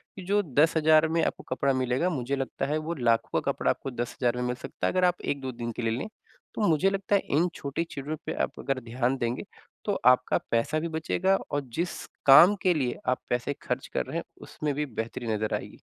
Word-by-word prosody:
कि 190 Hz, -, -8 dB
जो 205 Hz, +2 st, +3 dB
10,000 155 Hz, +1 st, +4 dB
में 165 Hz, +1 st, +1 dB
आपको -, -, -3 dB
कपड़ा 140 Hz, +1 st, +2 dB
मिलेगा 130 Hz, +6 st, +1 dB
मुझे 140 Hz, -4 st, -2 dB
लगता 135 Hz, -1 st, -3 dB
है 150 Hz, +2 st, 0 dB
वो -, -, 0 dB
लाखों 115 Hz, -2 st, +2 dB
का -, -, 0 dB
कपड़ा -, -, -1 dB
आपको 135 Hz, -, -5 dB
10,000 120 Hz, 0 st, -1 dB
में 125 Hz, -, -1 dB
मिल 125 Hz, -, -1 dB
सकता -, -, -4 dB
है -, -, +1 dB
अगर 185 Hz, 0 st, +3 dB
आप 180 Hz, 0 st, +1 dB
1-2 135 Hz, -2 st, -2 dB
दिन 120 Hz, -1 st, -5 dB
के 115 Hz, -, -5 dB
लिए 115 Hz, 0 st, 0 dB
लें। 135 Hz, -, -4 dB, 0.5 s
तो 210 Hz, -, +1 dB
मुझे 165 Hz, +4 st, +3 dB
लगता 195 Hz, +1 st, 0 dB
है 200 Hz, -, +3 dB, 0.2 s
इन 170 Hz, +3 st, +3 dB
छोटी 140 Hz, +4 st, -3 dB
चीज़ों 145 Hz, +3 st, -4 dB
पे 160 Hz, -, -2 dB
आप -, -, -4 dB
अगर 135 Hz, -1 st, -1 dB
ध्यान 120 Hz, +3 st, 0 dB
देंगे, 120 Hz, 0 st, -2 dB, 0.4 s
तो -, -, +1 dB
आपका 125 Hz, 0 st, +5 dB
पैसा 115 Hz, +7 st, +1 dB
भी 165 Hz, -, -2 dB
बचेगा 170 Hz, +4 st, +1 dB, 0.2 s
और 145 Hz, -, 0 dB, 0.2 s
जिस 175 Hz, +1 st, -2 dB, 0.2 s
काम 170 Hz, +9 st, +9 dB
के 185 Hz, -, +4 dB
लिए 130 Hz, -6 st, -1 dB
आप 125 Hz, 0 st, +1 dB
पैसे 120 Hz, +3 st, 0 dB
खर्च -, -, -3 dB
कर -, -, 0 dB
रहे -, -, -4 dB
हैं -, -, -2 dB, 0.2 s
उसमें 150 Hz, -1 st, -3 dB
भी 150 Hz, +1 st, -1 dB
बेहतरी 115 Hz, -1 st, -5 dB
नजर 110 Hz, 0 st, -2 dB
आएगी। -, -, -7 dB
140 Hz, 225 wpm, -27 LUFS, 125-165 Hz, 0.5 s, काम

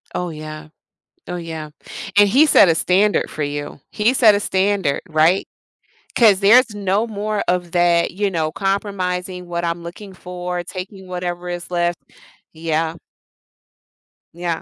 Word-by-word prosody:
Oh 180 Hz, -1 st, -2 dB
yeah. 155 Hz, 0 st, -8 dB, 0.6 s
Oh 180 Hz, -, -4 dB
yeah. 160 Hz, -3 st, -6 dB, 0.5 s
And 205 Hz, -, +7 dB
he 280 Hz, +8 st, +5 dB
set 195 Hz, -, +6 dB
a 165 Hz, -, +3 dB
standard 195 Hz, +5 st, +2 dB
for 155 Hz, -, -4 dB
you. 145 Hz, 0 st, -5 dB
He 215 Hz, +4 st, +2 dB
set 225 Hz, -6 st, +6 dB
a -, -, +1 dB
standard, 190 Hz, -6 st, 0 dB
right? 160 Hz, +4 st, +3 dB, 0.7 s
'Cause 210 Hz, -5 st, +5 dB
there's 225 Hz, +3 st, +5 dB
no 205 Hz, +2 st, 0 dB
more 210 Hz, -1 st, -2 dB
of 175 Hz, -1 st, 0 dB
that, 175 Hz, -1 st, +3 dB
you 200 Hz, +2 st, -1 dB
know, 160 Hz, -3 st, -1 dB
compromising 185 Hz, -2 st, -2 dB
what 175 Hz, 0 st, -3 dB
I'm 170 Hz, 0 st, -2 dB
looking 190 Hz, +3 st, -9 dB
for, 180 Hz, -1 st, -5 dB
taking 185 Hz, +1 st, -8 dB
whatever 180 Hz, -1 st, -4 dB
is 175 Hz, 0 st, -6 dB
left, 175 Hz, -1 st, 0 dB, 0.5 s
yeah. 160 Hz, 0 st, -2 dB, 1.4 s
Yeah, 170 Hz, -1 st, -3 dB
180 Hz, 145 wpm, -20 LUFS, 170-200 Hz, 1.4 s, And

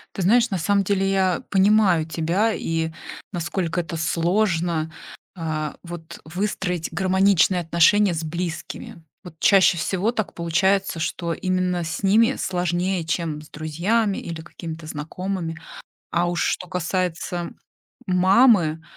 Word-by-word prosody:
Ты 190 Hz, -, -2 dB
знаешь, 235 Hz, +5 st, +4 dB
на 190 Hz, -, -1 dB
самом 200 Hz, +4 st, +2 dB
деле 195 Hz, 0 st, +1 dB
я 190 Hz, -3 st, +1 dB
понимаю 195 Hz, -4 st, +4 dB
тебя, 170 Hz, +8 st, 0 dB
и 165 Hz, -3 st, -2 dB, 0.4 s
насколько 175 Hz, 0 st, -2 dB
это 165 Hz, 0 st, -5 dB
сложно, 170 Hz, -1 st, 0 dB, 0.5 s
а, 155 Hz, -3 st, -3 dB
вот 170 Hz, -2 st, -9 dB
выстроить 180 Hz, 0 st, -2 dB
гармоничные 190 Hz, -1 st, +3 dB
отношения 170 Hz, +3 st, +4 dB
с 160 Hz, 0 st, -3 dB
близкими. 175 Hz, +4 st, -5 dB, 0.2 s
Вот 175 Hz, -3 st, -10 dB
чаще 195 Hz, -3 st, +5 dB
всего 190 Hz, +6 st, 0 dB
так 220 Hz, -4 st, -3 dB
получается, 185 Hz, +1 st, +1 dB
что 170 Hz, +1 st, -2 dB
именно 185 Hz, -1 st, -1 dB
с 160 Hz, +5 st, -4 dB
ними 225 Hz, +6 st, +4 dB
сложнее, 180 Hz, 0 st, -1 dB
чем 160 Hz, -2 st, -2 dB
с 155 Hz, -, -15 dB
друзьями 190 Hz, +8 st, 0 dB
или 165 Hz, -1 st, -6 dB
какими-то 160 Hz, -1 st, -8 dB
знакомыми. 165 Hz, +2 st, -4 dB, 0.5 s
А 175 Hz, +1 st, +1 dB
уж 175 Hz, 0 st, -1 dB
что 180 Hz, -, -1 dB
касается 180 Hz, -1 st, -2 dB, 0.6 s
мамы, 185 Hz, -3 st, +4 dB
175 Hz, 125 wpm, -23 LUFS, 165-195 Hz, 0.6 s, чаще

